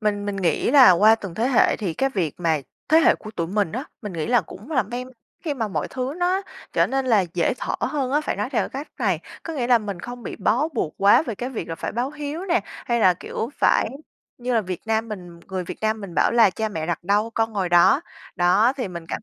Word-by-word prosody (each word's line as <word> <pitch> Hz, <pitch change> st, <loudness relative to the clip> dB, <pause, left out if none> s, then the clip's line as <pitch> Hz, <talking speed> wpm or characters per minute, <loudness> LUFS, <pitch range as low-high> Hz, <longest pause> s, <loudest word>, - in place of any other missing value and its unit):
Mình 205 Hz, -1 st, 0 dB
mình 205 Hz, -1 st, -2 dB
nghĩ 175 Hz, -5 st, +1 dB
là 270 Hz, -7 st, +8 dB
qua 210 Hz, +5 st, +6 dB
từng 195 Hz, -6 st, -8 dB
thế 235 Hz, +6 st, 0 dB
hệ 250 Hz, -, +4 dB
thì 185 Hz, -7 st, -3 dB
cái 270 Hz, -, +1 dB
việc 175 Hz, -, -1 dB
mà 160 Hz, -3 st, +1 dB, 0.3 s
thế 315 Hz, +2 st, +6 dB
hệ -, -, +5 dB
của 215 Hz, -, -10 dB
tụi 170 Hz, -6 st, -3 dB
mình 200 Hz, -1 st, -1 dB
á, 255 Hz, +5 st, -3 dB, 0.2 s
mình 210 Hz, -3 st, -5 dB
nghĩ 160 Hz, -2 st, -3 dB
là 240 Hz, -1 st, +4 dB
cũng 210 Hz, +9 st, -12 dB
là 265 Hz, -5 st, +2 dB
bem 250 Hz, +1 st, -6 dB, 0.4 s
khi 300 Hz, -3 st, -1 dB
mà 225 Hz, -5 st, -2 dB
mọi -, -, -2 dB
thứ 260 Hz, +2 st, -3 dB
nó 365 Hz, +2 st, +1 dB, 0.3 s
trở -, -, +3 dB
nên, 270 Hz, 0 st, -1 dB
là, 215 Hz, -6 st, +4 dB
dễ 175 Hz, +6 st, +1 dB
thở -, -, -3 dB
hơn 275 Hz, -4 st, -1 dB
á, 295 Hz, -, +3 dB
phải 305 Hz, -, -3 dB
nói 210 Hz, +5 st, -2 dB
theo 250 Hz, -, 0 dB
cái 275 Hz, +2 st, -6 dB
cách -, -, -30 dB
này, 195 Hz, -9 st, +1 dB, 0.2 s
có 330 Hz, -, -5 dB
nghĩa 250 Hz, -5 st, -1 dB
là 245 Hz, -1 st, +5 dB
mình 200 Hz, -5 st, -6 dB
không 245 Hz, +3 st, -8 dB
bị -, -, -6 dB
bó 230 Hz, +9 st, +1 dB
buộc 230 Hz, -, -3 dB
quá 200 Hz, +7 st, +6 dB
về 240 Hz, -8 st, -4 dB
cái 245 Hz, +5 st, -4 dB
việc 230 Hz, -7 st, -5 dB
là 165 Hz, -, -3 dB
phải -, -, -5 dB
báo 245 Hz, +4 st, -1 dB
hiếu 300 Hz, +3 st, -5 dB
nè, 355 Hz, -2 st, +2 dB
hay 235 Hz, -2 st, -3 dB
là, 185 Hz, -4 st, +5 dB
kiểu, 225 Hz, +6 st, -5 dB
phải -, -, +4 dB, 0.5 s
như 250 Hz, 0 st, -2 dB
là 225 Hz, -, +4 dB
Việt 185 Hz, -4 st, -5 dB
Nam 225 Hz, +1 st, 0 dB
mình 175 Hz, -5 st, -8 dB
người 185 Hz, -1 st, -3 dB
Việt -, -, -7 dB
Nam 220 Hz, 0 st, 0 dB
mình 195 Hz, -4 st, -8 dB
bảo -, -, +3 dB
là 230 Hz, -4 st, +6 dB
"Cha 220 Hz, +4 st, -2 dB
mẹ 160 Hz, -6 st, -4 dB
đặt 175 Hz, 0 st, -3 dB
đâu 210 Hz, +4 st, +1 dB
con 225 Hz, 0 st, 0 dB
ngồi 195 Hz, -4 st, -1 dB
đó." 175 Hz, -, +5 dB, 0.4 s
Đó, 185 Hz, +7 st, +4 dB
thì 250 Hz, -7 st, -3 dB
mình 170 Hz, -2 st, -7 dB
cảm -, -, -3 dB
220 Hz, 265 wpm, -23 LUFS, 185-255 Hz, 0.5 s, là